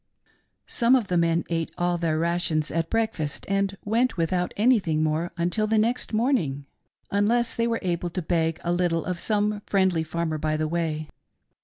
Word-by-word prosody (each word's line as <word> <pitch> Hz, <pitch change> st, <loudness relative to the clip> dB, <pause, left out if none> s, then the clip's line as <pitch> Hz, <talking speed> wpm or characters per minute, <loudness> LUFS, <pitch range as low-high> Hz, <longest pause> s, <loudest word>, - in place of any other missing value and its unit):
Some 235 Hz, +2 st, +3 dB
of 235 Hz, -6 st, 0 dB
the 180 Hz, -, +1 dB
men, 170 Hz, 0 st, +2 dB
ate 165 Hz, -1 st, -1 dB
all 175 Hz, 0 st, 0 dB
their 160 Hz, -2 st, 0 dB
rations 165 Hz, -2 st, 0 dB
at 165 Hz, 0 st, -1 dB
'breakfast,*and 195 Hz, -1 st, -1 dB
went 230 Hz, +2 st, +1 dB
without 175 Hz, +2 st, 0 dB
anything 200 Hz, -9 st, +3 dB
more 155 Hz, +3 st, 0 dB
until 180 Hz, +6 st, +1 dB
the 220 Hz, +1 st, +2 dB
next 235 Hz, +4 st, 0 dB
morning, 215 Hz, -, 0 dB, 0.5 s
unless 230 Hz, +4 st, +2 dB
*they 230 Hz, 0 st, 0 dB
were 230 Hz, -1 st, 0 dB
abtt 175 Hz, -1 st, -2 dB
to 185 Hz, -, -2 dB
beg 165 Hz, -1 st, 0 dB
a 175 Hz, -, 0 dB
little 175 Hz, -2 st, 0 dB
of 180 Hz, -2 st, -3 dB
some 210 Hz, +1 st, 0 dB
friendly 190 Hz, -4 st, +2 dB
farmer 160 Hz, -1 st, -2 dB
by 155 Hz, 0 st, 0 dB
the 155 Hz, 0 st, 0 dB
way. 155 Hz, -2 st, -2 dB
175 Hz, 170 wpm, -25 LUFS, 165-210 Hz, 0.5 s, Some